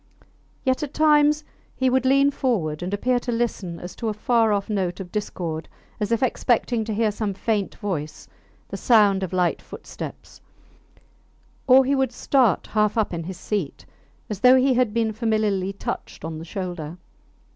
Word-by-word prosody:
Yet 260 +3 +1
at 295 -2 -5
times 300 0 +4 0.3
he 260 - +1
would 260 0 +2
lean 275 +1 +4
forward 180 - -1
and 180 +2 -3
appear 245 +5 +1
to 245 - -4
listen 215 -7 -2
as 180 - -8
for 225 - -3
a 210 - -3
far 225 0 +2
off 200 -1 0
note 190 -4 -2
of 180 -2 -7
discord, 170 -6 -4 0.3
as 210 +1 -2
if 230 +2 +1
expecting 240 -2 +1
to 220 - -3
hear 220 0 +2
some 205 -1 -3
faint 205 0 -1
voice, 160 -7 -5 0.4
the - - -5
sound 205 -5 +4
of 190 - -3
light 180 -2 +1
footsteps; - - -9 1.3
or 265 0 +7
he 275 - +1
would 265 -1 +1
start 250 -9 +2
half 210 0 +1
up 215 -4 +1
in 165 -1 -4
his 185 0 -6
seat, 195 -9 -4 0.4
as 210 -3 -5
though 250 +4 +7
he 260 +1 +4
had 250 -3 +2
been 225 0 0
familiarly 210 -4 0
touched 195 -5 -6
on 160 -1 -5
the 165 - -8
shoulder. 175 -3 -5
215 Hz, 175 wpm, -23 LUFS, 185-250 Hz, 1.3 s, or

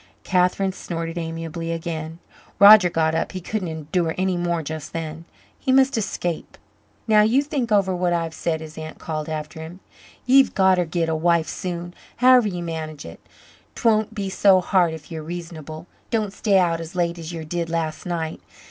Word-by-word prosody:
Catherine 185 +1 +1
snorted 165 -2 -5
amiably 165 0 -4
again. 165 -1 -4 0.4
Roger 200 -1 +9
got 160 -1 +1
up 165 - -1
he 185 - -4
couldn't 190 +1 -3
endure 160 +1 -2
any 185 0 +1
more 175 -1 -1
just 155 0 -6
then. 165 0 -5 0.3
He 265 - 0
must 265 +1 +4
escape. 175 -6 -3 0.5
"Now 215 -1 +6
you 235 +7 +3
think 275 -6 -3
over 195 -3 +3
what 180 0 0
I've 165 -2 -1
said," 160 0 -2
his 160 0 -9
aunt 155 0 -8
called 155 -1 -5
after 155 0 -5
him. 165 +3 -9 0.5
"Ye've 265 +2 +5
gotter 190 -2 +4
git 165 +1 -1
a 160 - 0
wife 165 0 +2
soon, 175 -2 -5 0.2
however 250 -2 +5
ye 180 -3 -4
manage 160 -3 -5
it. 85 0 -10 0.6
'Twon't 220 -1 +1
be 200 -2 -3
so 190 0 +4
hard 175 -2 +2
if 155 0 -13
ye're 160 -1 -5
reasonable. 160 -1 -7 0.2
Don't 215 -4 -1
stay 200 -1 +2
out 170 -3 +2
as 165 +3 -9
late 170 -1 -1
as 165 0 -6
ye 165 -2 -6
did 170 +1 -3
last 165 0 -3
night. 165 -2 -3
170 Hz, 180 wpm, -23 LUFS, 160-190 Hz, 0.6 s, Roger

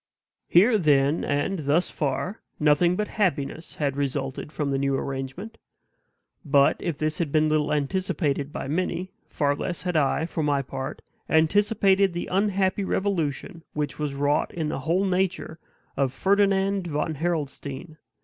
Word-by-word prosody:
Here, 210 +6 +5
then, 145 -2 +3
and 145 +7 -1
thus 155 +4 +1
far, 180 +7 -2 0.2
nothing 155 +4 +4
but 210 +2 -1
happiness 160 -5 -2
had 140 -3 -1
resulted 140 0 -3
from 150 -3 -2
the 135 - 0
new 140 0 +1
arrangement. 135 +11 -5 0.8
But, 140 -2 +4
if 165 -5 -3
this 155 0 -1
had 165 -5 -1
been 155 0 +3
little 155 -1 +1
anticipated 150 -2 -1
by 135 - -5
many, 180 +4 -2 0.2
far 145 -1 0
less 175 +4 -4
had 180 -2 -2
I, 155 +1 +2
for 165 -1 -3
my 145 -2 +1
part, 135 +1 -6 0.3
anticipated 195 +3 +3
the 175 - -3
unhappy 195 0 +1
revolution 175 -3 -2
which 150 0 -3
was 150 -2 -2
wrought 145 +1 +1
in 160 -3 -3
the - - -3
whole 170 +7 +1
nature 185 -3 -1 0.4
of 135 -2 +1
Ferdinand 195 +1 +2
von 155 0 -1
Harrelstein. 155 -1 -3
155 Hz, 150 wpm, -25 LUFS, 145-185 Hz, 0.8 s, Here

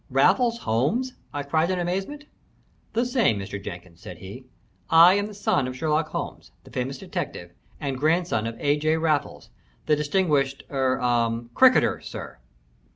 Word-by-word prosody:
"Raffles 240 -2 +3
Holmes?" 160 - 0 0.2
I 145 - -4
cried 160 +4 +1
in 185 - 0
amazement. 195 +12 -3 0.7
"The 235 +3 +1
same, 240 - +2
Mr. 100 0 -6
Jenkins," 90 -3 -9
said 90 - -9
he. 100 +9 -10 0.4
"I 165 +3 +8
am 205 +1 0
the 210 - -10
son 150 -9 +1
of 130 0 -6
Sherlock 155 +1 0
Holmes, - - -6
the - - -16
famous 130 +2 -3
detective, 85 -7 -5 0.3
and 135 -4 -3
grandson 155 -7 +1
of 115 - -5
A. 145 +1 +2
J. 155 +2 +1
Raffles, 155 -3 -1 0.3
the 150 - +3
distinguished 145 -3 0
er 130 -2 +1
ah 120 -2 +1
cricketer, 260 -1 +4
sir." - - -8
145 Hz, 155 wpm, -25 LUFS, 125-180 Hz, 0.7 s, I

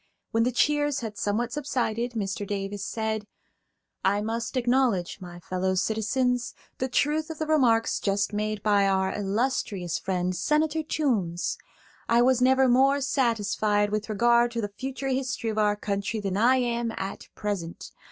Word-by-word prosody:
When 225 - +2
the 250 - +1
cheers 290 +2 +1
had 220 -3 -5
somewhat 225 +4 -1
subsided, 245 -5 -1
Mr. 200 -2 -3
Davis 200 0 -3
said: 220 -1 -3 0.8
"I 200 +1 +2
must 230 +4 -3
acknowledge, 240 -8 +1
my 175 -1 -9
fellow 185 +2 -1
citizens, 245 +5 0 0.2
the 260 - 0
truth 300 +5 0
of 320 - -6
the 315 - -2
remarks 250 -8 +3
just 200 +1 0
made 210 0 -2
by 205 -2 +3
our 190 -1 +1
illustrious 205 -3 -1
friend, 185 -1 -1
Senator 305 - +1
Toombs. 225 - -1 0.5
I 235 +1 +5
was 255 0 +3
never 260 +1 +5
more 270 +3 +4
satisfied 215 -6 +1
with 215 +1 -2
regard 235 +3 +4
to 230 - -1
the 205 - -3
future 270 +3 -4
history 255 -3 -1
of 215 - -2
our 210 -1 +3
country 205 +1 -2
than 195 -2 -2
I 240 +6 +4
am 235 -2 0
at 195 +1 -5
present. 195 -6 -4
225 Hz, 155 wpm, -26 LUFS, 205-255 Hz, 0.8 s, I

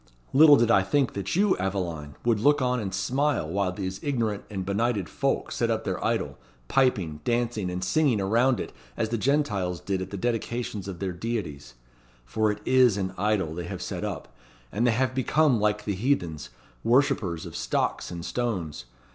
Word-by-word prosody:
Little 150 +1 +8
did 120 -3 +3
I 95 - +6
think 130 +7 +1
that 100 - -3
you, 200 +1 +3
Aveline, 85 -7 -3
would 115 -3 +3
look 145 +6 +4
on 125 -1 +1
and 100 -4 -3
smile 135 - 0
while 95 +2 0
these 95 0 -5
ignorant 115 -8 -1
and 95 -3 -4
benighted 100 -1 0
folk - - -1
set - - 0
up - - 0
their - - -3
idol, - - -1 0.3
piping, 95 - +1
dancing, 120 -5 0
and 90 +1 -3
singing 135 +2 +2
around 115 +6 +2
it - - -5 0.2
as 110 - 0
the 115 - -1
Gentiles 105 - 0
did 95 -1 -2
at 95 - -5
the 100 - -5
dedications 115 -2 -2
of 95 -3 -5
their 95 +1 -3
deities. 85 - -5 0.5
For 105 - +1
it 105 0 -7
is 130 -5 +5
an 95 -1 -2
idol 100 -5 0
they 85 +1 -5
have - - -5
set - - -4
up, - - -5 0.4
and 115 +5 +1
they - - +4
have 130 +2 0
become 135 0 +2
like 105 0 0
the 105 - -1
heathens, 95 - -1 0.3
worshippers 110 - +2
of - - -9
stocks - - -1
and 85 -1 -6
stones. 90 - -3
105 Hz, 185 wpm, -26 LUFS, 95-125 Hz, 0.5 s, Little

